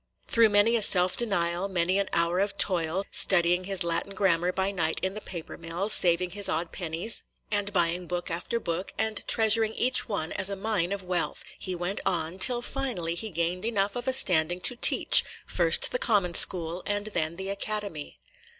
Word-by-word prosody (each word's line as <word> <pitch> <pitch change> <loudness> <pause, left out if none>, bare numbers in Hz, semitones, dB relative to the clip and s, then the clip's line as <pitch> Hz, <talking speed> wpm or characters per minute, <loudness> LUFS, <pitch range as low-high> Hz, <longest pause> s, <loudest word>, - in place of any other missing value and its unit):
Through 230 -1 +3
many 205 +3 +2
a 230 - -1
self 180 -2 +4
denial, 180 -4 -2
many 185 +1 -1
an 200 - -3
hour 170 +2 0
of 200 +1 -2
toil, 180 0 0
– - - -37
studying 180 -1 +1
his 195 -1 +1
Latin 170 +4 -3
grammar 180 -2 0
by 190 +1 -2
night 165 -4 -2
in 190 0 -2
the 215 - -8
paper 170 -5 -10
mill, 170 +5 -5
saving 180 -2 +3
his 205 +1 -1
odd 165 +1 -3
pennies, 175 +5 -4 0.3
and 205 -1 -2
buying 175 -1 -1
book 175 0 -5
after 175 +7 -4
book, 175 -2 -5
and 220 -1 -2
treasuring 220 -1 +4
each 255 0 +1
one 185 -6 -4
as 190 -1 -1
a 200 - -4
mine 195 -3 -2
of 200 -1 -5
wealth, 180 -1 -3
– - - -29
he 185 -1 -5
went 175 +3 -4
on, 175 -1 -3
till 240 +3 +6
finally 240 -12 -4
he 220 +6 -5
gained 170 +1 -3
enough 205 -3 -2
of 245 +1 -6
a 260 - 0
standing 175 -8 +2
to 245 - +1
teach, - - +6 0.2
first - - +2
the - - -3
common 200 - +1
school 170 -1 +4
and 205 0 -2
then 155 +1 -2
the 190 +2 -6
Academy. 200 -6 -6
190 Hz, 195 wpm, -25 LUFS, 170-205 Hz, 0.3 s, till